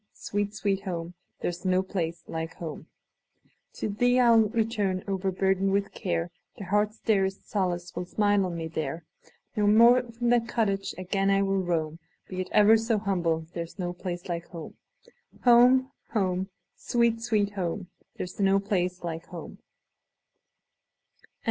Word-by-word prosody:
sweet, 205 0 -3
sweet 200 -2 0
home! 175 -3 -4 0.3
There - - 0
's 175 +2 -10
no 185 0 +2
place 170 -3 -3
like 160 0 -4
home! 160 -3 -7 0.9
To - - -3
thee 245 +5 +2
I 245 -1 +5
'll 225 -2 +5
return, 215 -5 0
overburdened 190 0 +1
with 200 0 0
care; 175 -2 -2 0.3
The - - -7
heart's 210 +3 +1
dearest 195 -4 0
solace 180 -3 -2
will 175 0 -4
smile 205 0 +2
on 170 -1 -4
me 165 -1 -3
there; 160 0 -4 0.5
No 210 -1 +2
more 235 +4 +7
from 240 +1 -1
that 235 -1 +3
cottage 200 -5 -1
again 195 +2 -1 0.2
will 195 0 +1
I - - -7
roam; 160 -2 -1 0.3
Be 185 -1 -4
it 185 - -6
ever 210 +2 +6
so 225 0 0
humble, 175 -6 0
there 170 -1 -4
's - - -18
no 175 -2 -3
place 175 0 -6
like 170 -1 -4
home. 165 -2 -9 0.7
Home! 250 +2 +6 0.2
home! 190 -3 0 0.3
sweet, 235 -1 +1
sweet 215 -3 +1
home! 185 -1 -4 0.2
There - - -3
's 180 - -11
no 195 0 +4
place 185 -3 -1
like 165 -1 -5
home! 170 -3 -9
195 Hz, 160 wpm, -27 LUFS, 175-215 Hz, 0.9 s, more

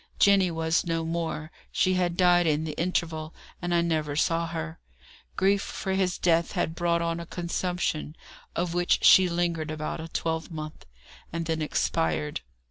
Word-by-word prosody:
Jenny 195 -2 +5
was 165 0 +1
no 165 -1 -1
more; 160 -1 -3 0.2
she 185 - +2
had 175 -2 0
died 175 -2 +5
in 155 0 +2
the 160 - -3
interval, 160 -1 -2 0.3
and 175 0 -2
I 170 -1 +3
never 155 -3 -1
saw 165 +2 +1
her. 165 -1 -5 0.6
Grief 195 +1 +3
for 190 -2 -3
his 190 -2 +1
death 170 -1 +2
had 160 - -1
brought 170 0 +1
on 170 0 -1
a 170 - -6
consumption, 175 -3 -2 0.4
of 170 0 -1
which 175 0 +2
she 185 -1 +8
lingered 170 -2 -1
about 155 +1 -4
a 160 - -6
twelvemonth, 160 -1 -4 0.4
and 165 0 -3
then 160 -1 -1
expired. 80 - 0
170 Hz, 160 wpm, -27 LUFS, 160-175 Hz, 0.6 s, she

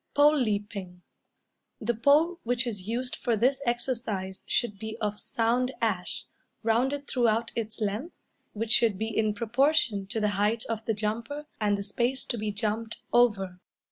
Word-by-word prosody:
Pole 295 +1 +6
Leaping. 205 -7 -2 0.8
The 235 +2 0
pole 300 +9 +4
which 245 +1 +1
is 205 -5 -4
used 250 +3 -2
for 235 - 0
this 260 +5 +2
exercise 230 -6 -1
should 210 -5 0
be 220 +1 -5
of 210 -2 -2
sound 245 +3 0
ash, 205 -6 -1 0.4
rounded 265 +6 +1
throughout 230 -2 +1
its 220 -1 -3
length, 215 - -2 0.4
which 220 +1 -3
should 225 -4 +4
be 220 +1 -3
in 215 -1 +2
proportion 235 -2 +2
to 220 - -2
the 210 -1 +2
height 210 +3 +1
of 225 -1 -3
the 225 - 0
jumper 230 +8 -3
and 205 -2 +2
the 200 - -4
space 240 +6 -1
to 240 - -2
be 210 0 -1
jumped 215 +2 -2 0.2
over. 200 -7 +3
225 Hz, 160 wpm, -28 LUFS, 210-245 Hz, 0.8 s, Pole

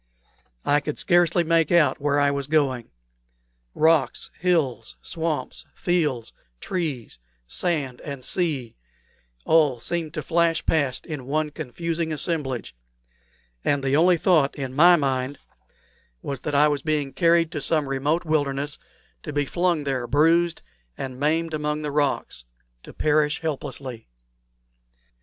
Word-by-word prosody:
I 145 +1 +4
could 150 0 -5
scarcely 175 0 +3
make 165 -1 +2
out 170 -4 +3
where 145 0 +2
I 145 0 +3
was 140 -1 -3
going. 140 -6 +1 0.9
Rocks, 160 0 +2
hills, 155 -11 0
swamps, 160 -2 -3
fields, 150 -10 -1 0.3
trees, 150 - -4 0.3
sand, 140 - -2
and 140 -3 -6
sea 150 -10 -1 0.7
all 150 -6 +3
seemed 165 +4 -3
to 155 - -3
flash 165 +2 +1
past 140 -5 0
in 145 -6 -6
one 150 +1 -1
confused 165 +3 -4
assemblage, 150 - -2 0.9
and 140 -1 +1
the 135 0 +1
only 175 +3 +5
thought 160 -5 +3
in 135 -3 -5
my 175 +5 +7
mind 135 -2 -1 0.9
was 140 -2 -4
that 145 - -3
I 150 +2 +6
was 145 -2 -1
being 150 -2 -1
carried 170 0 +3
to 150 - -4
some 150 -1 +1
remote 145 +6 0
wilderness, 145 -2 -1 0.4
to - - -6
be 145 0 0
flung 175 0 0
there 130 -3 -2
bruised 165 +5 +2 0.3
and 130 -1 -6
maimed 160 +3 0
among 150 0 -2
the 150 - -3
rocks, 140 - -1 0.4
to - - -12
perish 150 0 +1
helplessly. 135 - -5
150 Hz, 135 wpm, -24 LUFS, 135-165 Hz, 0.9 s, my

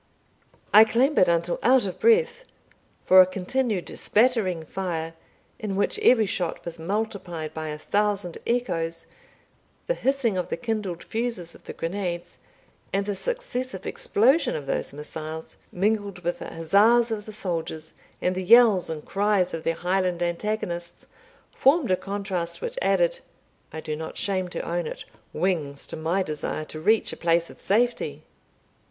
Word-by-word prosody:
I 215 +1 +10
clambered 235 - +3
until 170 0 +1
out 255 -2 +4
of 185 - -5
breath; 470 +1 +3 0.6
for 185 0 +9
a - - +7
continued 195 +2 -2
spattering 210 -8 +2
fire, 165 -3 -3 0.5
in 205 -3 -3
which 205 - 0
every 255 - +5
shot 180 -3 -3
was 170 -1 -6
multiplied 175 -4 -3
by 160 0 -5
a 150 0 -4
thousand 200 +1 -1
echoes, 170 -9 -1 0.8
the - - +1
hissing 260 - 0
of 180 - -3
the - - -2
kindled 210 -7 -3
fusees 225 -7 -3
of - - -18
the - - -7
grenades, 175 0 -4 0.5
and 195 +1 0
the 205 - -1
successive 255 - -4
explosion 265 +10 +2
of 145 - -5
those - - -2
missiles, 155 +2 -7 0.2
mingled 200 -1 -1
with 175 +1 -2
the - - -6
huzzas 215 +8 +4
of 210 -2 -3
the - - -6
soldiers, 165 -5 -4 0.3
and 180 - +2
the 185 - -3
yells 220 -2 +6
and 155 -2 -5
cries 200 -2 +1
of 165 -1 -4
their 165 - 0
Highland 180 0 0
antagonists, 175 -1 -3 0.5
formed 275 - +3
a - - +5
contrast 190 -3 -4
which 485 0 -4
added - - +2 0.5
I 160 - -6
do 155 - -4
not 160 +1 -7
shame 190 -2 -1
to 175 - -5
own 170 -1 -1
it - - -7 0.3
wings 155 -5 -1
to - - -7
my 165 +4 0
desire 155 -1 -4
to 155 - -8
reach 215 +7 +2
a - - -8
place 170 0 +1
of - - -13
safety. 240 +4 0
190 Hz, 155 wpm, -25 LUFS, 170-220 Hz, 0.8 s, I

